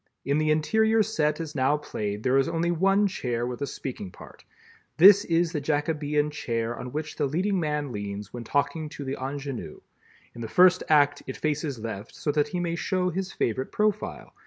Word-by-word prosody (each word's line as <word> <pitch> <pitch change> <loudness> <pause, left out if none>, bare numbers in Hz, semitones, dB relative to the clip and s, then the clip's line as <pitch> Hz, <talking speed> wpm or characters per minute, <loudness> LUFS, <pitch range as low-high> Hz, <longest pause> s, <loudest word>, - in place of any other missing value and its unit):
In 140 +2 +1
the 155 0 +1
interior 220 +9 +3
set 155 -8 0
as 160 -2 -5
now 140 +2 +2
played 105 -7 -4
there 130 +1 +3
is 135 - +2
only 170 +1 0
one 195 +4 +3
chair 120 -11 -2
with 125 +2 -5
a 140 - -1
speaking 120 -9 -6
part—this 200 - +2
is, 170 0 +1
the 150 -4 -2
Jacobean 150 0 0
chair 115 -4 -2
on 125 +1 -7
which 155 +2 -5
the 145 - +1
leading 185 +7 0
man 150 -4 -2
leans 100 -1 -6
when 120 -1 -6
talking 145 +5 -1
to 145 - -7
the 135 +1 -2
ingénue. 135 -1 -5 0.5
In 120 - -9
the 115 - -4
first 180 +8 +5
act, 145 -2 +4
it 130 - -5
faces 150 -3 -2
left 110 -1 -7
so 150 - -1
that 150 0 +1
he 175 +4 -3
may 170 -1 -1
show 180 +1 0
his 190 +2 -3
favorite 130 +3 -2
profile. 210 -2 -1
150 Hz, 190 wpm, -26 LUFS, 130-170 Hz, 0.5 s, first